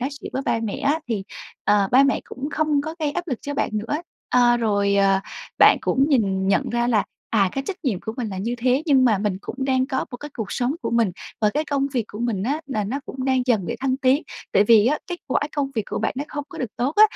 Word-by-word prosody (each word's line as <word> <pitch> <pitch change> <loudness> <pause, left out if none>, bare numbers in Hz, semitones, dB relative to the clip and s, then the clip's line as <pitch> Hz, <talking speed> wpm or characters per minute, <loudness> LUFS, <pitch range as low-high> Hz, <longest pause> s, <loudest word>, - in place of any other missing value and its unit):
nói 255 - 0
chuyện - - -7
với 265 - -2
ba 230 - 0
mẹ 215 - -2
á 290 +3 +1
thì, 215 -4 -1 0.4
ờ, 200 -2 +3
ba 265 - +7
mẹ 275 0 +2
cũng 275 +3 -6
không 300 -2 +1
có 315 +2 -5
gây 300 -2 0
áp 345 +4 -4
lực 255 -5 -2
cho 285 - -4
bạn - - 0
nữa. 215 +7 -1 0.4
Ơ, 245 -1 +5
rồi, 200 -3 +1
à, 195 -1 +3 0.4
bạn - - +8
cũng 270 +2 +2
nhìn 195 -8 +1
nhận 195 - +1
ra 240 0 +1
là, 220 -4 +2 0.3
à, 200 -4 +3
cái 270 - -3
trách 390 - -3
nhiệm 215 -9 0
của 220 - -5
mình 245 -4 -3
là 190 -2 -5
như 230 +5 -2
thế 255 +4 +2
nhưng 270 -3 +5
mà 220 -6 +4
mình 200 -2 -1
cũng - - -7
đang 260 -1 +2
có 265 - -1
một 245 - -6
cái 295 - -8
cuộc 215 -4 -4
sống 255 +4 0
của - - -2
mình 230 -4 +2 0.3
và 210 -1 +3
cái 300 +1 +1
công 280 -2 0
việc 240 -4 0
của 210 - -9
mình 230 -5 -1
á 285 +7 -1
là 220 -7 -2
nó 255 +8 -3
cũng 260 -1 -5
đang 260 -1 +2
dần 220 -8 +2
để 235 - -3
thăng 260 -1 +1
tiến, 270 +3 +3 0.3
tại 200 - +5
vì 220 0 +6
á, 295 +3 +2
kết 355 - -4
quả 260 - +1 0.2
công 275 -1 0
việc 220 - 0
của - - -3
bạn 220 - 0
nó 280 - -2
không 290 -1 -5
có - - -10
được 250 -5 -3
tốt 260 +5 0
á 425 - +8
245 Hz, 275 wpm, -23 LUFS, 215-275 Hz, 0.4 s, bạn